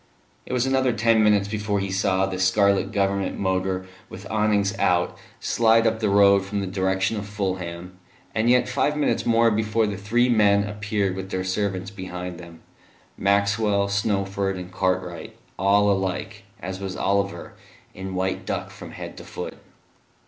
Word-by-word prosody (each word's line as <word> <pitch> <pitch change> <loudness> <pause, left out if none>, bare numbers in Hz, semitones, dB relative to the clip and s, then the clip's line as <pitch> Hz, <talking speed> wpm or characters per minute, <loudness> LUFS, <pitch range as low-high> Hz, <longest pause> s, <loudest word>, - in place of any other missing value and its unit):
It - - -5
was 125 0 +1
another 130 -2 +2
ten 115 0 +3
minutes 105 -2 +3
before 105 -1 -1
he 100 0 -3
saw 95 0 +1
the 95 -1 -4
scarlet 100 +1 +2
Government 100 -1 0
motor, 95 -1 -1 0.2
with - - -10
awnings 105 -2 +1
out, 90 -1 +2 0.2
slide 115 0 +3
up 110 0 +1
the 110 -2 +1
road 100 -1 +5
from 100 +1 -3
the 100 - -2
direction 95 +2 0
of 100 0 -5
Fulham; 90 -3 -4 0.3
and 110 +2 +1
yet 125 0 +4
five 140 +3 0
minutes 150 - 0
more 115 0 +4
before 110 +1 +1
the 105 -2 -3
three 120 +5 +2
men 105 -4 +4
appeared 105 -2 -2
with 95 0 -6
their 95 -1 -2
servants 95 0 -2
behind 90 -2 -6
them 85 -2 -12 0.5
Maxwell, 100 +1 +2
Snowford 100 -1 -1
and 90 0 -8
Cartwright, 95 0 -2 0.2
all 100 +2 +4
alike, 95 +1 -3
as 95 +1 -6
was 95 -1 -5
Oliver, 100 0 -1 0.4
in 95 0 -6
white 95 +1 -1
duck - - -4
from - - -10
head - - -8
to - - -9
foot. - - -6
100 Hz, 165 wpm, -24 LUFS, 95-105 Hz, 0.5 s, road